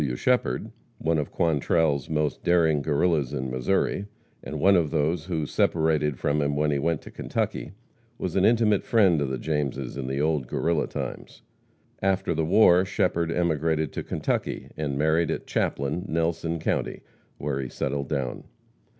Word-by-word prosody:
W. 65 -4 -1
Shepherd, 120 - 0 0.3
one 80 0 +1
of 75 - -3
Quantrell's 75 -3 +1
most 75 -1 -1
daring 80 -4 +3
Guerrillas 75 -1 +1
in 65 0 -3
Missouri, 95 +9 0 0.4
and - - -5
one 100 +2 +5
of 85 -4 +2
those 80 +3 0
who 80 -4 -2
separated 75 -3 +1
from 75 +3 0
him 70 0 0
when 75 +1 +1
he 70 - 0
went 85 +1 -1
to - - -11
Kentucky, - - -3 0.4
was 90 - -4
an 95 - +3
intimate 110 -2 +3
friend 95 -9 +3
of 70 - -1
the 65 - -2
Jameses 70 -2 -2
in 65 -2 -4
the 70 +1 -2
old 75 -4 0
Guerrilla 80 +4 0
times. - - -7 0.6
After 95 0 +1
the 80 - 0
war 90 +1 +5
Shepherd 85 -3 0
emigrated 80 -3 0
to - - -3
Kentucky - - -2
and 70 -3 -2
married 80 +2 +2
at - - -3
Chaplin, 75 +8 -1
Nelson 85 0 -1
county, 80 - -2 0.4
where 70 -1 -2
he 65 - -5
settled 70 0 -3
down. 70 -5 -3
80 Hz, 165 wpm, -26 LUFS, 70-85 Hz, 0.6 s, one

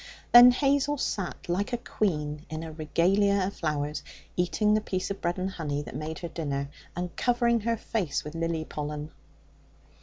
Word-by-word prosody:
Then 240 +1 +11
Hazel 280 +3 +2
sat 195 -8 -3
like 195 +7 -1
a - - +2
queen 150 -10 -2
in 155 +1 -4
a 160 - -6
regalia 185 +6 +2
of 200 - -3
flowers, 150 -2 -2 0.3
eating 210 +4 +2
the 215 - +3
piece 185 -2 -2
of 200 - -5
bread 175 +2 0
and 185 +1 -2
honey 145 -5 -3
that - - -9
made 155 +1 -4
her 170 - -5
dinner, 140 -4 -3 0.3
and 175 0 -4
covering 240 -1 +2
her 230 +1 0
face 195 -9 -2
with 150 - -7
lily 165 -1 -2
pollen. 150 0 -5
175 Hz, 175 wpm, -28 LUFS, 155-210 Hz, 0.3 s, Then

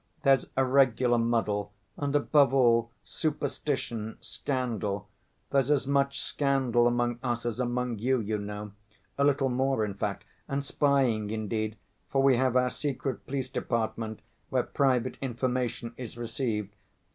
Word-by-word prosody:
There's 135 -2 +4
a 135 - +4
regular 125 -2 +4
muddle, 105 -3 0 0.2
and, 145 0 -2
above 145 -2 +4
all, 115 -3 +4
superstition, 135 -7 -2
scandal; 110 -7 -3 0.4
there's 135 -1 +2
as 145 -3 +3
much 140 0 +1
scandal 130 -4 +2
among 120 0 0
us 120 -2 -2
as 120 0 -2
among 125 -2 -1
you, 130 +3 +2
you 105 -1 -2
know; 105 0 -6 0.5
a - - +4
little 140 -1 +3
more 130 -2 +1
in 100 - -4
fact, 100 +1 -3 0.2
and 140 0 -2
spying, 130 -8 +2
indeed, 110 0 -2 0.3
for 135 0 +2
we 135 -2 +6
have 130 0 +2
our 125 0 +3
secret 135 +1 -3
police 130 -1 -2
department 110 -3 -2 0.3
where - - +2
private 130 -4 +1
information 125 -2 -2
is 120 -2 -7
received. 115 -4 -2
125 Hz, 140 wpm, -29 LUFS, 115-135 Hz, 0.5 s, we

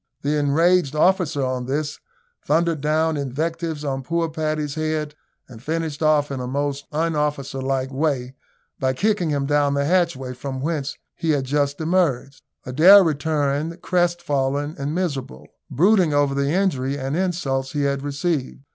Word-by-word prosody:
The 145 +2 +1
enraged 155 +1 +2
officer, 165 -4 +2
on 130 -1 -3
this, 145 +2 -2 0.4
thundered 165 -1 +1
down 155 +1 +1
invectives 155 +3 -3
on 135 -1 -2
poor 165 +4 -1
Paddy's 155 -2 -2
head, 155 -1 -2 0.3
and 115 -4 -12
finished 160 +1 -3
off 150 -2 +3
in 135 - -3
a 125 - -4
most 140 +1 -2
un 160 +1 0
officer 145 -2 -2
like 135 0 -1
way 135 -3 -1 0.5
by 130 -1 +1
kicking 195 +2 0
him 140 -2 0
down 145 0 +2
the 140 0 +1
hatchway 165 -7 0
from 130 +1 -6
whence 145 -1 -3 0.2
he 165 - -3
had 145 -3 +2
just 140 +1 0
emerged. 160 -5 0 0.2
Adair 175 +10 +7
returned 155 0 -1
crestfallen 150 -5 0
and 145 +3 -3
miserable, 145 -8 -3 0.2
brooding 175 - +3
over 145 -1 +2
the 140 0 0
injury 145 -7 0
and 135 +1 -3
insults 160 -8 -1
he 145 -1 0
had 140 -1 0
received. 145 -1 -2
145 Hz, 155 wpm, -22 LUFS, 140-165 Hz, 0.5 s, Adair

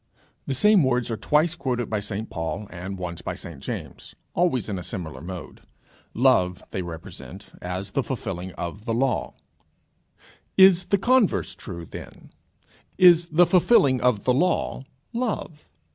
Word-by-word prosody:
The 135 - -1
same 210 - +5
words 125 -2 +1
are - - 0
twice 150 - +2
quoted 125 -3 -2
by 110 - -1
St 105 +2 -4
Paul, 85 +5 -4
and 95 +2 -6
once 90 -2 -5
by - - -4
St 80 -5 -9
James, - - -7 0.2
always 165 - +1
in 100 -4 -3
a - - -7
similar 85 -7 -6
mode: 90 0 -8 0.5
Love 105 -8 +3
they 95 - -2
represent 90 +3 -9
as 90 +2 -4
the 135 - +1
fulfilling 95 -9 -5
of 100 +5 -6
the 115 -2 -1
law. 130 -1 0 1.2
Is 190 -2 +7
the 200 - +2
converse 240 +1 +2
true 85 -6 -8
then? - - -11 0.7
Is 175 -2 +7
the 170 +2 +5
fulfilling 170 - +4
of 125 -5 +2
the 125 - +3
law 170 -2 0 0.3
love? 225 -10 -3
115 Hz, 150 wpm, -24 LUFS, -, 1.2 s, Is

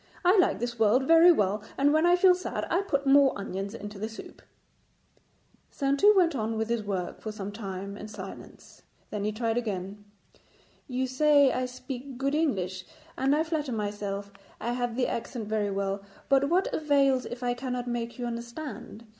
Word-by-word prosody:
I 365 +3 +6
like 365 - +3
this 240 -1 -4
world 225 +5 +4
very 330 +2 +8
well, 205 - +1 0.2
and 285 +2 +3
when 315 +2 +4
I 350 - +6
feel 365 0 +6
sad 365 +1 -3
I 355 - +3
put 280 -8 -1
more 275 0 +5
onions 195 +1 -5
into 205 -2 -8
the 215 +2 -3
soup.' 225 - -11 1.3
Saintou 280 +10 +3
went 340 -5 +3
on 220 -2 -2
with 220 0 -2
his 235 -1 0
work 190 -4 -4
for 215 - -4
some 205 -1 -6
time 200 -2 -6
in 210 - -8
silence, 215 - -11 0.3
then 205 -1 -3
he 210 - 0
tried 225 +2 -1
again. 200 -2 -5 0.8
'You 260 -1 -1
say 285 +1 +4
I 255 0 -1
speak 255 +1 -8
good 275 +2 -1
English, 190 - -1 0.3
and 270 +2 +2
I 310 - +2
flatter 310 -5 -2
myself 205 -2 -4 0.3
I 235 +3 -2
have 245 -1 -2
the 250 0 +1
accent 230 -1 -4
very 210 -1 0
well, 195 0 -2 0.3
but 275 0 +4
what 365 +3 +1
avails 275 -4 +2
if 245 +1 -7
I 245 0 +1
cannot 250 0 -4
make 235 0 -3
you 245 - -3
understand? 235 0 -7
245 Hz, 180 wpm, -28 LUFS, 210-280 Hz, 1.3 s, very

